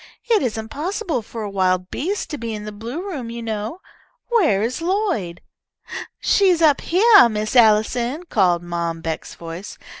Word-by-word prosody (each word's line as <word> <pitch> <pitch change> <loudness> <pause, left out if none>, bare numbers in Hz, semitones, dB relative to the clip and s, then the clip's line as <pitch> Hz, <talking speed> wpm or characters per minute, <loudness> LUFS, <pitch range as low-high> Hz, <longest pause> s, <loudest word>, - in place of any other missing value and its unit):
It 435 -4 +5
isn't 220 -2 -3
possible 335 - -2
for 225 +1 -7
a 205 - -4
wild 185 -1 0
beast 385 +7 -3
to 295 - -4
be 230 -1 -4
in 210 0 -7
the 210 - -6
blue 235 - -6
room 270 -11 -5
you 235 0 -6
know. 220 - -4 0.5
Where 330 - +3
is 245 +7 -2
Lloyd?" 345 - -1 0.8
"She's 375 -4 +3
up 305 -4 +4
heah, 405 - +6
Miss 215 +1 -3
Allison," 235 +6 +3
called 180 - +2
Mom 170 -1 -3
Beck's 160 -1 -5
voice. 170 +4 -8
230 Hz, 160 wpm, -21 LUFS, 205-335 Hz, 0.8 s, heah